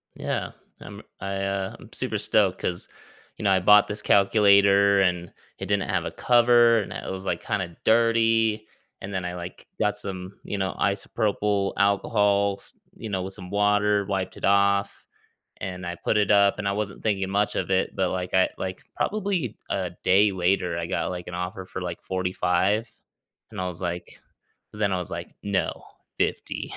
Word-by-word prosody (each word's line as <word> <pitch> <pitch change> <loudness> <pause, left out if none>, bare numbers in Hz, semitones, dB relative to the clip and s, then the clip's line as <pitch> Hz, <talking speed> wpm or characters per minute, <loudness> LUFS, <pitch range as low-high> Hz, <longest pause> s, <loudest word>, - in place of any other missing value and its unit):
Yeah, - - -3 0.3
I'm - - -10 0.2
I, 100 0 -4
uh, 95 -1 -2
I'm - - -15
super - - -2
stoked - - +2
'cause 90 -1 -2 0.5
you - - -7
know 100 - +3
I 95 - +4
bought 105 +3 +6
this 105 +1 -3
calculator, 100 -1 +5
and 90 -2 0 0.3
it - - -6
didn't 100 -1 0
have - - 0
a - - -3
cover, 120 -1 +5
and 105 - -5
it - - -6
was, 95 0 -6
like, - - -2
kinda 90 -4 -3
dirty, 115 -1 +3 0.3
and 100 +1 -7
then 95 -1 -2
I, 90 - -3
like, 90 0 -9
got 105 -1 +1
some, 95 -1 -7
you 105 - -4
know, 95 -1 -1
isopropyl 100 0 0
alcohols, 100 0 +1 0.2
you 110 - -7
know, 95 -2 -2
with 95 +1 -5
some 90 -2 -8
water, 105 0 +2
wiped 95 -1 -3
it - - -3
off, 100 0 +2 0.5
and 90 -1 -6
I 85 0 -4
put 105 - 0
it 105 0 +2
up, 100 0 +4
and 105 - -2
I - - +2
wasn't 100 -1 -4
thinking 95 -3 0
much 100 +2 0
of - - -2
it, 95 0 +1
but, 95 -1 +1
like, 90 -1 -4
I 95 0 +4
like, 95 0 -5
probably 195 - -1
a 95 -2 -2
day 100 +3 +4
later, 90 -2 0
I 85 -1 -3
got, - - -1
like, 90 -1 -6
an 90 - -6
offer 90 +1 -5
for 95 - -7
like 90 -1 -5
45, 95 +4 0 0.6
and - - -5
I 90 - -2
was 90 -1 -6
like 85 -1 -3 0.7
then 105 -2 0
I - - 0
was, 90 -2 -5
like, - - -5
"No, 100 -1 -2 0.3
50." - - -2
100 Hz, 185 wpm, -25 LUFS, 95-105 Hz, 0.7 s, bought